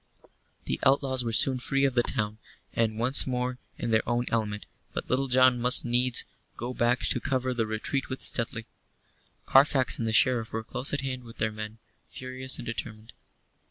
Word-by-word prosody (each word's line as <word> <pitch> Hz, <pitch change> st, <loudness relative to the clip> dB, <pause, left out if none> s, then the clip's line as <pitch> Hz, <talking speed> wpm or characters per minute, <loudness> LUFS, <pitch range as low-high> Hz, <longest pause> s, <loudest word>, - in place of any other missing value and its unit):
The -, -, -3 dB
outlaws 135 Hz, -1 st, +2 dB
were 115 Hz, -, -3 dB
soon 130 Hz, +3 st, +5 dB
free 135 Hz, +2 st, 0 dB
of 135 Hz, -, 0 dB
the 120 Hz, -, +3 dB
town, 110 Hz, -2 st, -2 dB, 0.3 s
and 110 Hz, -2 st, 0 dB
once 125 Hz, +5 st, +5 dB
more 125 Hz, 0 st, -2 dB, 0.2 s
in 120 Hz, -, -3 dB
their 110 Hz, 0 st, +3 dB
own 120 Hz, +1 st, 0 dB
element, 105 Hz, -2 st, -2 dB, 0.3 s
but -, -, -5 dB
Little 135 Hz, +2 st, 0 dB
John 130 Hz, -1 st, +4 dB
must 125 Hz, +1 st, +6 dB
needs 120 Hz, +1 st, +2 dB, 0.3 s
go 120 Hz, +2 st, -5 dB
back 120 Hz, +1 st, +1 dB
to -, -, 0 dB
cover 130 Hz, -2 st, -2 dB
the 115 Hz, -3 st, -2 dB
retreat 110 Hz, +5 st, -3 dB
with 130 Hz, -, -5 dB
Stuteley. 115 Hz, -1 st, -1 dB, 0.8 s
Carfax 135 Hz, -1 st, +4 dB
and 115 Hz, -, -2 dB
the -, -, 0 dB
Sheriff 115 Hz, 0 st, +2 dB
were 110 Hz, 0 st, -4 dB
close 125 Hz, +4 st, -3 dB
at 145 Hz, -, -2 dB
hand 130 Hz, -2 st, -5 dB
with 115 Hz, -1 st, -13 dB
their 110 Hz, 0 st, -1 dB
men, 110 Hz, +1 st, -7 dB, 0.3 s
furious 130 Hz, 0 st, -6 dB
and -, -, -8 dB
determined. 110 Hz, -1 st, -6 dB
125 Hz, 185 wpm, -27 LUFS, 115-130 Hz, 0.8 s, must